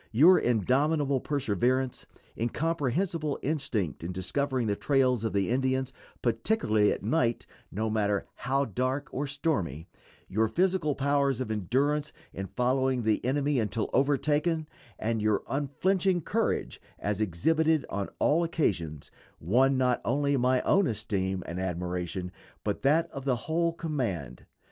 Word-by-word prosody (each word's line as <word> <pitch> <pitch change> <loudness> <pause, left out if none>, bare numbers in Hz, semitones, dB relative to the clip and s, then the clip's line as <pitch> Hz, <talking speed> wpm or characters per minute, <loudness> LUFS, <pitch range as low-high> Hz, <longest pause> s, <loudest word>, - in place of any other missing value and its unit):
Your 160 +11 +7
indomitable 135 - +2
perseverance, 130 -1 -1 0.3
incomprehensible 155 - -1
instinct 125 - -2
in 85 - -3
discovering 125 +8 -1
the 105 -2 0
trails 130 -2 +2
of 110 - 0
the 100 +2 0
Indians 130 0 0 0.3
particularly 115 - +2
at - - -3
night, 120 0 +1 0.3
no 110 +3 -2
matter 105 -2 0
how 135 +1 0
dark 130 +5 -2
or 140 +2 -2
stormy 100 - -2 0.4
your 110 +4 +1
physical 175 - +1
powers 140 -2 +1
of 130 -4 -3
endurance 135 - 0 0.2
in 95 0 -5
following 130 +3 +1
the 110 -1 +1
enemy 140 +1 +1
until 110 0 -2
overtaken, 150 +3 +1 0.3
and 110 0 -1
your 105 -1 +1
unflinching 175 +7 +1
courage, 225 +8 -1 0.2
as 105 +1 -2
exhibited 155 - +2
on 100 0 -3
all 165 +4 +3
occasions, 85 - -1 0.3
won 130 - +3
not 125 -1 +2
only 140 +3 +1
my 130 0 +2
own 195 -2 +3
esteem 95 -4 -2
and 85 +2 -5
admiration, 90 0 -3 0.3
but 105 -1 -2
that 155 +4 +3
of 135 - -7
the 130 -2 +1
whole 170 +1 +1
command. 130 - -4
130 Hz, 135 wpm, -28 LUFS, 105-145 Hz, 0.4 s, Your